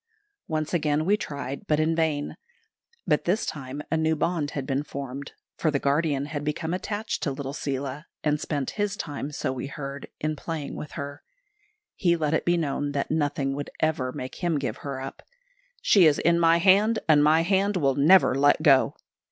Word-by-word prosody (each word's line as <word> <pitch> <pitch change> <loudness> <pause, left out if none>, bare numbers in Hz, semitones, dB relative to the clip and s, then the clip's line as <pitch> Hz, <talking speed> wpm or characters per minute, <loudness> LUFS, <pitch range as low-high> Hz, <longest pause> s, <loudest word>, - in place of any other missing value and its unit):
Once 155 0 -2
again 155 -2 +1
we 200 +3 +4
tried, 140 -8 -6
but 150 -1 +2
in 160 +1 +2
vain. 155 -3 0 0.7
By 150 -4 +3
this 185 +8 0
time 140 0 -5
a 160 - +2
new 160 0 +2
bond 160 -2 0
had 135 - -2
been 135 +1 0
formed, 140 -1 -7 0.2
for 160 - +1
the 145 - +1
guardian 140 0 +1
had 145 0 -4
become 160 +3 -2
attached 210 +3 -3
to 145 - 0
little 135 0 -5
Seela, 140 +1 -4 0.2
and 150 0 +1
spent 145 -4 -2
his 205 -1 -1
time, 145 -1 -5
so 140 -2 -2
we 130 +1 -5
heard, 140 0 -7
in 155 0 -1
playing 150 -1 -5
with 150 - -7
her. 140 0 -6 0.7
He 175 -2 +2
let 155 -2 -1
it 155 - 0
be 175 0 +3
known 145 -2 -1
that 140 - -2
nothing 145 -3 0
would 145 +1 -5
ever 145 -5 0
make 130 +5 -7
him 170 -3 +2
give 140 - -3
her 140 -2 -5
up. 135 +1 -7 0.6
"She 185 -5 +6
is 145 - +3
in 170 0 +3
my 165 0 +5
hand, 200 +5 +4
and 150 -2 +6
my 155 +2 +5
hand 195 +3 +1
will 140 -5 +2
never 155 +6 +5
let 145 +3 +3
go." 135 -4 +5
150 Hz, 195 wpm, -26 LUFS, 140-165 Hz, 0.7 s, She